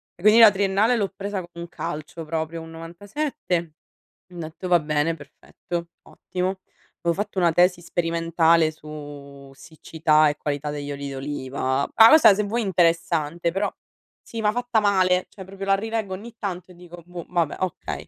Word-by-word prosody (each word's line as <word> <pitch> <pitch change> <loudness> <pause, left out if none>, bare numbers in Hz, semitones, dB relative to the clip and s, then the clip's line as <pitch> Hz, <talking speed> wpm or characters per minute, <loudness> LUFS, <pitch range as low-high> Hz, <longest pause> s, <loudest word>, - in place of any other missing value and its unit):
E 175 - -18
quindi 215 +2 +7
la 225 -2 +10
triennale 200 +4 +2
l'ho 200 -4 -1
presa 200 0 -4
con 175 - -9
un 170 0 -7
calcio 155 0 -6
proprio, 160 +1 -3
un 165 0 -10
97. 190 - -3 0.7
Ho - - -13
detto: 160 +3 -7
"Va 175 -1 +5
bene 150 +2 0
perfetto, 170 +3 -7 0.2
ottimo". 185 +1 -4 0.4
Avevo 170 +2 0
fatto 205 -2 -7
una 170 -2 +4
tesi 175 +1 +3
sperimentale 165 -1 +2
su 145 -3 -11
siccità 155 0 +1
e 145 - -4
qualità 145 0 -3
degli 145 -1 -5
oli 140 0 -5
d'oliva. 135 -1 -2
Ma 225 0 +9
questa 310 -9 +8
se 210 - 0
vuoi 230 +4 -1
interessante, 170 -3 +1
però, 195 +3 0 0.5
sì 230 -1 -7
ma 210 0 +2
fatta 245 -1 0
male, 185 -3 +2
cioè 190 - -11
proprio 195 +1 -8
la 195 - +3
rileggo 220 -1 -2
ogni 225 +4 -9
tanto 185 -2 -5
e - - -15
dico: 175 0 -12
"Boh 175 0 -9
vabbè, 170 -4 0
okay", 185 -3 -4
175 Hz, 170 wpm, -23 LUFS, 155-195 Hz, 0.7 s, la